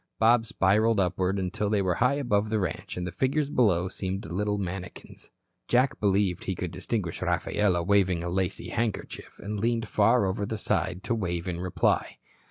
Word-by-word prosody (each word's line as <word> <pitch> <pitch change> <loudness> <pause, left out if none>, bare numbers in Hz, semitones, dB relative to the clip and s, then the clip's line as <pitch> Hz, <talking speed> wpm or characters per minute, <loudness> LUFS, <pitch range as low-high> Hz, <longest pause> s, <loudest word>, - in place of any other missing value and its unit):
Bob 115 0 +4
spiralled 105 +3 +2
upward 90 +1 0
until 95 +2 -2
they 105 -1 +2
were 95 -2 +1
high 125 +3 +4
above 110 -7 0
the 110 - +1
ranch, 90 -2 -4
and 90 - -3
the 90 - -4
figures 140 - 0
below 95 -7 +3
seemed 95 +1 -4
little 105 +5 -1
manikins. 95 -1 -7 0.4
Jack 125 +2 +2
believed 100 -3 +1
he 95 - -2
could 90 -1 -4
distinguish 90 0 -3
Rafaela 90 +1 +1
waving 95 -2 +2
a 85 - -2
lacy 95 +1 -2
handkerchief, 115 -2 -4
and 105 0 -5
leaned 115 +1 0
far 110 +2 +3
over 95 +2 -1
the 110 +2 -3
side 95 -2 -1
to 120 - -1
wave 90 -5 -2
in 85 -1 -3
reply. 90 0 0
100 Hz, 175 wpm, -27 LUFS, 90-110 Hz, 0.4 s, Bob